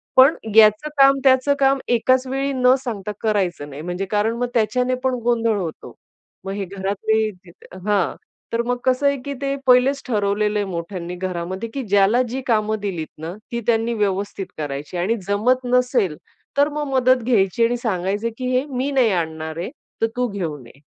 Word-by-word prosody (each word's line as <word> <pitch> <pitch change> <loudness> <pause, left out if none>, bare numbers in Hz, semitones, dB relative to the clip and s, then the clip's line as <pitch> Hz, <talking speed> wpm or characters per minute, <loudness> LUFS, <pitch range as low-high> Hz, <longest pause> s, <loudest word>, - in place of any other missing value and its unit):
पण 265 +4 +7 0.2
याचं 215 +6 +6
काम, 275 0 +6
त्यांचं 265 +1 +4
काम, 270 0 +3
एकाच 255 +2 +2
वेळेस 270 +1 -1
न 250 0 +5
सांगता 210 -5 -4
करायचं 190 -9 -1
नाही, 145 +1 -8
म्हणजे 180 +3 -3
कारण 215 +2 +1
मग 245 - -1
त्याच्याने 250 +3 +1
पण 260 -1 +1
गोंधळ 230 -2 +1
होतो. 170 -5 -6 0.5
मग 195 - -3
हे 200 -1 -3
घरातले 200 +3 -1
जिथे 180 0 -16
हां. 200 -4 +1 0.4
तर 230 - +2
मग 245 0 0
कसं 260 +2 +2
आहे, 280 0 +2
की 280 - -3
ते 275 0 -1
पहिलेच 255 +2 +4
ठरवलेलं 210 -2 0
आहे 205 - 0
मोठ्यांनी 175 0 -5
घरामध्ये, 185 +3 -4
की 275 - -3
ज्याला 205 +3 +3
जी 260 +3 -3
कामं 215 -2 +1
दिलीत 175 -6 -3
ना, 165 +2 -5 0.2
ती 235 0 -2
त्यांनी 230 0 +2
व्यवस्थित 200 -2 -2
करायची. 145 +2 -5
आणि 190 +7 +1
जमत 245 +6 +1
नसेल, 250 - +1 0.4
तर 285 +1 +4
मग 295 0 -3
मदत 255 -1 +3
घ्यायची 225 -2 +2
आणि 240 +1 0
सांगायचं, 205 -1 -1
की 255 - -3
हे 260 - 0
मी 265 +1 -2
नाही 255 -5 +3
आणणार 160 -3 -3
आहे, 175 - -3 0.3
तर 225 - +3
तू 250 0 0
घेऊन 160 - -5
ये. 135 - -18
220 Hz, 180 wpm, -21 LUFS, 190-255 Hz, 0.5 s, पण